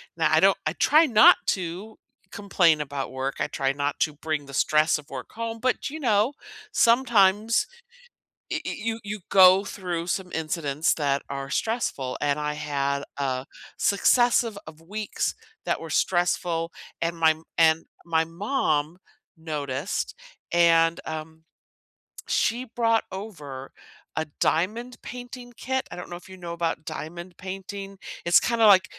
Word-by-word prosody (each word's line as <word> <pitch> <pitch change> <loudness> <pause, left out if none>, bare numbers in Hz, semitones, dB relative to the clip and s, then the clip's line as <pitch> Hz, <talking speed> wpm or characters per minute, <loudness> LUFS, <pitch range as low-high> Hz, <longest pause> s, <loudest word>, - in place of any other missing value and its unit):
now - - +2
I - - +5
don't - - +5
I - - 0
try 315 +2 +5
not 220 -6 +7
to 185 +4 -3 0.3
complain 175 -6 +2
about 140 -1 -4
work, 130 +1 -3
I - - 0
try 135 0 0
not 145 +1 -2
to 155 - +2
bring 150 0 -3
the 140 - -12
stress 155 +2 +3
of 150 -1 -13
work - - -7
home, 230 0 -4
but, 255 +3 0
you 315 +3 -7
know, 225 0 +2 0.4
sometimes 230 - +4 0.9
y - - -1
y - - -3
you 225 +1 -2
you 205 +1 -5
go 190 0 +7
through 175 -4 -4
some 185 0 -2
incidents 155 0 0
that 140 -2 0
are 135 0 -5
stressful, 180 - -1
and 145 0 +1
I 150 0 -2
had 140 -2 -1
a 130 -1 -2 0.3
successive 230 +1 +3
of 155 0 -12
weeks 210 +5 -3 0.3
that - - 0
were - - -8
stressful, 175 -2 0 0.3
and 170 +1 -1
my 160 -1 +5 0.2
and 160 0 +4 0.2
my 160 -1 +2
mom 165 - -1 0.4
noticed, 145 0 -3 0.4
and, 165 -1 +4
um, 160 0 -7 0.8
she 240 +3 +1
brought 230 -2 +1
over 150 -10 -8 0.4
a 160 - -1 0.2
diamond 225 +9 0
painting 245 0 -9
kit, 260 +1 -2
I - - -7
don't 180 - -7
know - - -5
if 175 - -13
you 190 - -11
know 175 -2 -7
about 165 -2 -2
diamond 170 +2 -7
painting, 195 +1 -7 0.3
it's 170 0 +6
kinda 235 -2 +3
like 190 -2 +7
175 Hz, 150 wpm, -25 LUFS, 155-215 Hz, 0.9 s, not